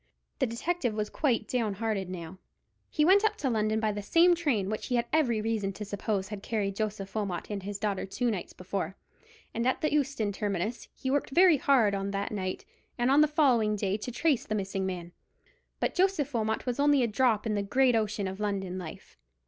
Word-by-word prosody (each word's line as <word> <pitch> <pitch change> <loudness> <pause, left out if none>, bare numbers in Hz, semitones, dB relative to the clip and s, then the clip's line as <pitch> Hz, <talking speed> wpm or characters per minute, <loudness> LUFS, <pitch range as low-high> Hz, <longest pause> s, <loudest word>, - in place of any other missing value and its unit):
The - - +2
detective 245 +1 -1
was 210 -1 -2
quite 240 -8 0
down 225 -5 -1
hearted 205 -3 -2
now. 180 0 -7 0.5
He 300 - +2
went 395 +4 +6
up 430 0 +2
to 270 -10 -1
London 215 -1 +1
by 215 -1 +1
the 205 0 -4
same 335 - +5
train 285 - 0
which 215 +1 -3
he 250 - 0
had 235 0 +1
every 245 -9 +2
reason 215 -3 -1
to 210 +2 -6
suppose 200 -1 -2
had 210 -2 -6
carried 200 -3 -2
Joseph 205 -2 -3
Wilmot 200 -4 -3
and 200 -1 -3
his 200 +1 -5
daughter 200 -2 -2
two 240 +4 0
nights 195 -5 -4
before, 190 +1 -4 0.6
and 230 +2 0
at 260 - +1
the 305 - +1
Euston 275 -8 0
terminus 205 +2 -3
he 260 - -3
worked 285 0 0
very 345 +2 +6
hard 250 -7 +3
on 195 0 -2
that 200 0 -2
night 185 -3 -3 0.3
and 240 +2 +2
on 285 +2 +6
the 305 - +6
following 250 -8 +3
day 200 -1 -1
to 230 +3 -6
trace 280 +2 +1
the 215 - -1
missing 195 -1 -2
man. 175 -2 -5 0.7
But - - 0
Joseph 360 -7 +1
Wilmot 220 -1 -1
was 250 +1 -2
only 285 -2 +4
a - - +2
drop 225 -1 +2
in 220 - 0
the 205 - 0
great 250 +5 +3
ocean 215 -2 0
of 190 +1 -6
London 195 -3 -2
life. 160 - -10
215 Hz, 215 wpm, -29 LUFS, 200-260 Hz, 0.7 s, went